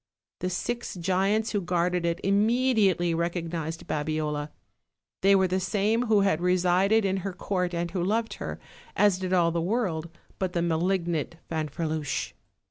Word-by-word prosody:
The 180 Hz, -, -1 dB
six 235 Hz, +6 st, -3 dB
giants 195 Hz, +5 st, +1 dB
who 205 Hz, -, 0 dB
guarded 175 Hz, 0 st, 0 dB
it 170 Hz, +1 st, -1 dB
immediately 205 Hz, -4 st, +3 dB
recognized 165 Hz, -1 st, -3 dB
Babiola! 150 Hz, -1 st, -2 dB, 0.7 s
They 195 Hz, +1 st, +5 dB
were 190 Hz, -1 st, +4 dB
the 185 Hz, +1 st, 0 dB
same 210 Hz, +5 st, +1 dB
who 215 Hz, -2 st, +4 dB
had 195 Hz, -5 st, +2 dB
resided 185 Hz, +4 st, +3 dB
in 195 Hz, 0 st, +1 dB
her 190 Hz, 0 st, -4 dB
court 180 Hz, -1 st, -2 dB
and 170 Hz, 0 st, -2 dB
who 180 Hz, -1 st, -1 dB
loved 225 Hz, +4 st, 0 dB
her, -, -, -4 dB, 0.4 s
as 205 Hz, -3 st, +3 dB
did 185 Hz, -1 st, -3 dB
all 175 Hz, -2 st, +3 dB
the 170 Hz, 0 st, -1 dB
world 175 Hz, -5 st, -1 dB, 0.3 s
but 185 Hz, -2 st, -1 dB
the 170 Hz, -, 0 dB
malignant 170 Hz, -1 st, 0 dB, 0.2 s
Fanferluche. 155 Hz, -1 st, -2 dB
180 Hz, 150 wpm, -27 LUFS, 170-200 Hz, 0.7 s, They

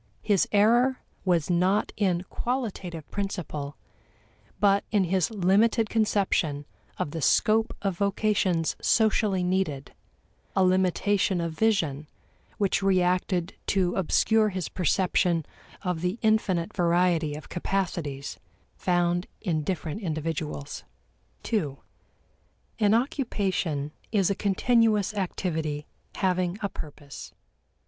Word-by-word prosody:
His 205 Hz, -4 st, +2 dB
error 240 Hz, +5 st, +4 dB, 0.3 s
was 175 Hz, -2 st, +2 dB
not 185 Hz, +4 st, +2 dB
in 185 Hz, -4 st, +1 dB
qualitative 195 Hz, -, -4 dB
principle, 165 Hz, -8 st, -4 dB, 0.8 s
but 200 Hz, -1 st, +4 dB
in 205 Hz, -3 st, +3 dB
his 185 Hz, -1 st, +1 dB
limited 215 Hz, +2 st, +2 dB
conception 190 Hz, -9 st, +1 dB, 0.3 s
of 145 Hz, -, -2 dB
the 165 Hz, -, -4 dB
scope 220 Hz, -, +2 dB
of 195 Hz, -3 st, -1 dB
vocations 200 Hz, -4 st, +1 dB
socially 210 Hz, -4 st, +2 dB
needed; 180 Hz, -7 st, -1 dB, 0.6 s
a 190 Hz, -, +4 dB
limitation 185 Hz, +1 st, +2 dB
of 170 Hz, -1 st, -2 dB
vision 160 Hz, -8 st, 0 dB, 0.5 s
which 200 Hz, -2 st, +1 dB
reacted 180 Hz, -2 st, +1 dB
to 185 Hz, -3 st, +1 dB
obscure 215 Hz, +4 st, +3 dB
his 185 Hz, -3 st, -4 dB
perception 180 Hz, -2 st, +1 dB, 0.4 s
of 180 Hz, -4 st, -2 dB
the 180 Hz, +4 st, -1 dB
infinite 200 Hz, -6 st, +1 dB
variety 170 Hz, -3 st, +2 dB
of 150 Hz, -, -9 dB
capacities 170 Hz, -7 st, -3 dB, 0.4 s
found 175 Hz, 0 st, +1 dB
in 165 Hz, -7 st, -1 dB
different 170 Hz, +3 st, -3 dB
individuals. 155 Hz, -4 st, -4 dB, 0.6 s
2. 155 Hz, -, -1 dB, 1.0 s
An 210 Hz, 0 st, +4 dB
occupation 195 Hz, -, -1 dB, 0.2 s
is 200 Hz, -3 st, +2 dB
a -, -, +3 dB
continuous 215 Hz, +1 st, +2 dB
activity 160 Hz, -6 st, -2 dB, 0.3 s
having 185 Hz, -1 st, 0 dB
a 200 Hz, -, 0 dB
purpose. 145 Hz, -4 st, -9 dB
185 Hz, 105 wpm, -27 LUFS, 165-205 Hz, 1.0 s, error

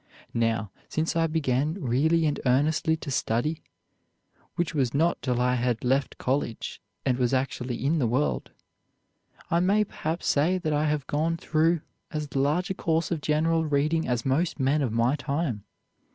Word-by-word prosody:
Now, 115 Hz, -4 st, 0 dB, 0.2 s
since 160 Hz, +1 st, -1 dB
I 165 Hz, 0 st, +3 dB
began 150 Hz, -1 st, 0 dB
really 160 Hz, +1 st, +2 dB
and 150 Hz, -1 st, 0 dB
earnestly 155 Hz, +5 st, +2 dB
to 150 Hz, -2 st, -6 dB
study, 130 Hz, +6 st, 0 dB, 0.9 s
which 170 Hz, -1 st, -1 dB
was 135 Hz, -4 st, 0 dB
not 165 Hz, +4 st, +2 dB
till 125 Hz, -2 st, 0 dB
I 125 Hz, 0 st, +2 dB
had 120 Hz, -2 st, 0 dB
left 135 Hz, +2 st, +1 dB
college 130 Hz, -3 st, -2 dB, 0.2 s
and 130 Hz, -2 st, +1 dB
was 125 Hz, +1 st, +2 dB
actually 130 Hz, -1 st, -2 dB
in 160 Hz, +3 st, +2 dB
the 125 Hz, -, +2 dB
world, 130 Hz, +6 st, 0 dB, 1.0 s
I 170 Hz, -, +4 dB
may 200 Hz, +4 st, +3 dB
perhaps 165 Hz, -4 st, -4 dB
say 165 Hz, +6 st, +2 dB
that 160 Hz, -4 st, -1 dB
I 150 Hz, +1 st, +2 dB
have 150 Hz, -3 st, 0 dB
gone 160 Hz, +4 st, 0 dB
through 160 Hz, +1 st, +1 dB, 0.3 s
as 150 Hz, -3 st, -5 dB
large 150 Hz, +7 st, +1 dB
a -, -, +1 dB
course 165 Hz, -2 st, 0 dB
of 165 Hz, -3 st, -1 dB
general 160 Hz, +2 st, +2 dB
reading 155 Hz, +2 st, +1 dB
as 120 Hz, -2 st, -1 dB
most 150 Hz, +5 st, 0 dB
men 140 Hz, +3 st, +2 dB
of 130 Hz, -5 st, 0 dB
my 115 Hz, +4 st, +2 dB
time. 140 Hz, -6 st, -2 dB
150 Hz, 165 wpm, -27 LUFS, 130-160 Hz, 1.0 s, I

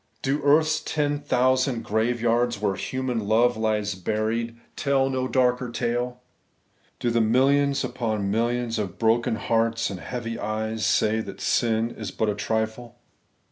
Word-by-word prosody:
Do 140 Hz, +2 st, 0 dB
earth's 155 Hz, +2 st, +4 dB
ten 145 Hz, -2 st, -1 dB
thousand 130 Hz, -2 st, +1 dB
graveyards, 120 Hz, +1 st, +1 dB
where 100 Hz, -2 st, 0 dB
human 130 Hz, +3 st, -2 dB
love 120 Hz, +3 st, +3 dB
lies 105 Hz, -2 st, 0 dB
buried, 110 Hz, +5 st, -2 dB, 0.2 s
tell 135 Hz, -2 st, +1 dB
no 130 Hz, -1 st, -1 dB
darker 125 Hz, -1 st, +1 dB
tale? 120 Hz, +1 st, -2 dB, 0.8 s
Do 120 Hz, -, 0 dB
the 115 Hz, 0 st, +2 dB
millions 135 Hz, +5 st, +3 dB
upon 110 Hz, -5 st, -2 dB
millions 115 Hz, +1 st, 0 dB
of 95 Hz, -4 st, -4 dB
broken 115 Hz, 0 st, +2 dB
hearts 115 Hz, +1 st, 0 dB
and 95 Hz, -, -6 dB
heavy 115 Hz, +2 st, -5 dB
eyes 110 Hz, 0 st, -2 dB
say 110 Hz, +1 st, +2 dB
that 110 Hz, -, -7 dB
sin 115 Hz, -1 st, +1 dB
is 110 Hz, -4 st, -6 dB
but 110 Hz, +3 st, -1 dB
a -, -, +1 dB
trifle 110 Hz, +3 st, -3 dB
115 Hz, 140 wpm, -25 LUFS, 110-125 Hz, 0.8 s, earth's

